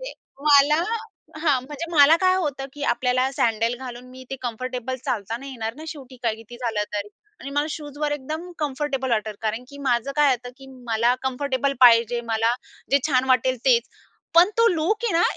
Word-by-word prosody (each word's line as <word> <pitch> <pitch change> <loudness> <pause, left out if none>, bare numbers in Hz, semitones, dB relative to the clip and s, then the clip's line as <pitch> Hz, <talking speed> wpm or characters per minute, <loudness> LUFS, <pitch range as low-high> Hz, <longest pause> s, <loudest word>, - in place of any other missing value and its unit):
ते, - - -6 0.3
मला 300 +2 +5 0.6
हां. 290 -5 +2
म्हणजे 300 +3 -6
मला 305 +1 +7
काय 370 0 +4
होतं, 285 -7 -2
की 290 - -9
आपल्याला 255 +1 +1
सँडल 230 -4 +1
घालून 250 -1 -8
मी 260 0 -11
ते 270 - -3
कम्फर्टेबल 250 +1 -4
चालता 220 0 -2
नाही 275 +3 -9
येणार 225 -3 -4
ना, 310 +4 -10
शेवटी 270 -5 -9
काय 230 -2 +1
किती 225 +2 -12
झालं 230 -4 -1
तरी. 205 0 -3 0.3
आणि 275 - -7
मला 290 +1 0
शूजवर 295 -1 -4
एकदम 310 +5 -5
कम्फर्टेबल 275 -3 -2
वाटतं, 215 -2 0
कारण 225 +3 -2
की 280 0 -12
माझं 265 0 0
काय 295 -1 +5
होतं, 245 +1 -9
की 270 - -14 0.2
मला 230 +2 +2
कम्फर्टेबल 265 +1 -1
पाहिजे. 235 -1 +6
मला 225 +2 +2 0.4
जे 280 - +5
छान 255 -3 +2
वाटेल 255 0 +3
तेच. 250 -1 +3 0.5
पण 345 +3 +7
तो 460 - +6
लूक 385 +6 0
आहे 430 - +1
ना 335 - +3
260 Hz, 185 wpm, -23 LUFS, 240-290 Hz, 0.6 s, मला